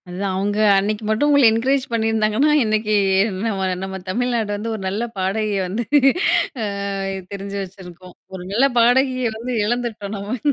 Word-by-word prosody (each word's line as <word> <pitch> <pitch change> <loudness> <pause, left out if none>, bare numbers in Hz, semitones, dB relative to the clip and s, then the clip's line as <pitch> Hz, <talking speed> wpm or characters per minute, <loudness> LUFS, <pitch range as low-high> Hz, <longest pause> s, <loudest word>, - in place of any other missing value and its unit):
அதுதான் 190 +2 -3
அவுங்க 205 +2 -1 0.2
அன்னக்கு 210 +2 -1
மட்டும் 220 +7 +1
உங்கள 285 -3 +5
என்கரேஜ் 260 +4 +1
பண்ணியிருந்தாங்கன்னா, 225 +4 +1
இன்னக்கு 215 -1 0 0.4
அ - - -6 0.2
நம்ம 195 -3 -1 0.2
நம்ம 190 0 -5
தமிழ்நாடு 235 +1 -1
வந்து 220 +3 -4
ஒரு 215 - -7
நல்ல 200 +5 -2
பாடகியை 200 +2 -1
வந்து 210 +6 -3 0.8
ஆ - - -1 0.7
தெரிஞ்சு 200 0 -6
வச்சிருக்கும். 185 -1 -12 0.2
ஒரு 180 - -7
நல்ல 245 +7 +3
பாடகியை 255 +1 +3
வந்து 245 +3 -4
இழந்துட்டோம் 220 -3 -3
நம்ம. 205 +5 -4
215 Hz, 150 wpm, -20 LUFS, 195-235 Hz, 0.8 s, உங்கள